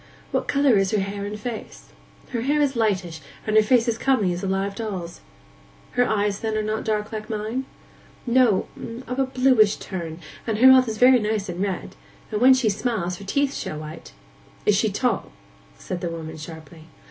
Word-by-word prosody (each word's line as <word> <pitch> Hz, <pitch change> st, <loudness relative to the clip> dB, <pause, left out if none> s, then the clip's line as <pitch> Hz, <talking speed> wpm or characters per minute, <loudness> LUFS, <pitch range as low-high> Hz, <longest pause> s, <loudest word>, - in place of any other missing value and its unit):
What -, -, -1 dB
colour 280 Hz, -5 st, +3 dB
is 195 Hz, -1 st, +2 dB
her 210 Hz, -, +1 dB
hair 200 Hz, +1 st, -3 dB
and 210 Hz, +1 st, -5 dB
face?' 230 Hz, 0 st, -7 dB, 0.4 s
'Her 235 Hz, -3 st, -2 dB
hair 290 Hz, +5 st, +1 dB
is 280 Hz, -2 st, +2 dB
lightish, 190 Hz, -8 st, -1 dB, 0.2 s
and 215 Hz, -, 0 dB
her 215 Hz, -, +8 dB
face 235 Hz, +2 st, +3 dB
as 230 Hz, -1 st, 0 dB
comely 215 Hz, -10 st, +2 dB
as 175 Hz, -, -5 dB
a -, -, -1 dB
live 195 Hz, +1 st, -1 dB
doll's.' 190 Hz, -6 st, -5 dB, 0.7 s
'Her 245 Hz, 0 st, +2 dB
eyes, 205 Hz, -2 st, 0 dB
then, 220 Hz, -1 st, -2 dB
are 215 Hz, -, 0 dB
not 215 Hz, +1 st, -2 dB
dark 210 Hz, -1 st, -1 dB
like 215 Hz, -1 st, -6 dB
mine?' 220 Hz, +4 st, -3 dB, 0.6 s
'No—of 245 Hz, +1 st, 0 dB
a 270 Hz, -, +2 dB
bluish 255 Hz, -5 st, +4 dB
turn, 170 Hz, -4 st, -6 dB, 0.3 s
and 220 Hz, -2 st, 0 dB
her 245 Hz, -, +4 dB
mouth 260 Hz, -1 st, +8 dB
is 220 Hz, -1 st, -3 dB
very 250 Hz, +2 st, +6 dB
nice 210 Hz, -2 st, -1 dB
and 175 Hz, +1 st, -4 dB
red; 195 Hz, -3 st, -3 dB, 0.4 s
and 210 Hz, 0 st, -2 dB
when 260 Hz, +1 st, +8 dB
she 255 Hz, -3 st, +1 dB
smiles, 200 Hz, -4 st, -1 dB
her 200 Hz, -, -10 dB
teeth 280 Hz, +7 st, +1 dB
show 155 Hz, -, -4 dB
white.' 155 Hz, +1 st, -9 dB, 0.5 s
'Is -, -, +4 dB
she -, -, +2 dB
tall?' -, -, -1 dB, 0.4 s
said 180 Hz, -, -5 dB
the 175 Hz, -, -2 dB
woman 160 Hz, -1 st, -6 dB
sharply. 160 Hz, 0 st, -11 dB
215 Hz, 195 wpm, -23 LUFS, 190-245 Hz, 0.7 s, her